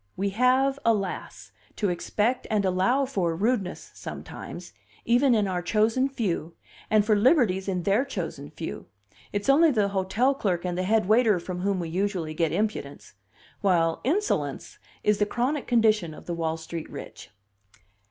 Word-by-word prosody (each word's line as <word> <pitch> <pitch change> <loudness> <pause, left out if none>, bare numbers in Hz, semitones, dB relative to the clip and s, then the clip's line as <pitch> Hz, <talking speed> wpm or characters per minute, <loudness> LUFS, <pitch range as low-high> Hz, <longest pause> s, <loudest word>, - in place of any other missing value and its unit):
We 200 +1 -1
have, 260 +5 +2
alas! 205 -5 -2 0.2
to 205 - 0
expect 210 +7 -1
and 210 -2 +1
allow 190 +9 +2
for 185 -10 -1
rudeness 205 0 -1
sometimes, - - -8 0.3
even 245 +2 +4
in 210 -2 +2
our 180 -2 -1
chosen 225 +8 +2
few, 180 - -3 0.3
and 215 -1 +4
for 215 -1 +3
liberties 205 - +3
in 180 -3 -1
their 200 +7 +2
chosen 165 - -5
few; 160 +2 -7 0.4
it's 205 0 -3
only 305 +4 +6
the 210 -7 +1
hotel 200 +7 +1
clerk 185 -10 -1
and 180 -1 -2
the 180 - -1
head 220 -2 +3
waiter 220 -2 +4
from 180 +1 -5
whom 195 0 0
we 170 -2 -4
usually 180 -3 -2
get 160 -1 0
impudence; 210 +5 -3 0.5
while 170 -5 +2
insolence 380 - -1 0.2
is 210 -1 +2
the 205 - +2
chronic 255 +6 -1
condition 215 -9 +2
of - - -13
the 175 - -3
Wall 165 -1 -2
Street 160 0 -7
rich." - - -9
205 Hz, 160 wpm, -26 LUFS, 180-240 Hz, 0.5 s, only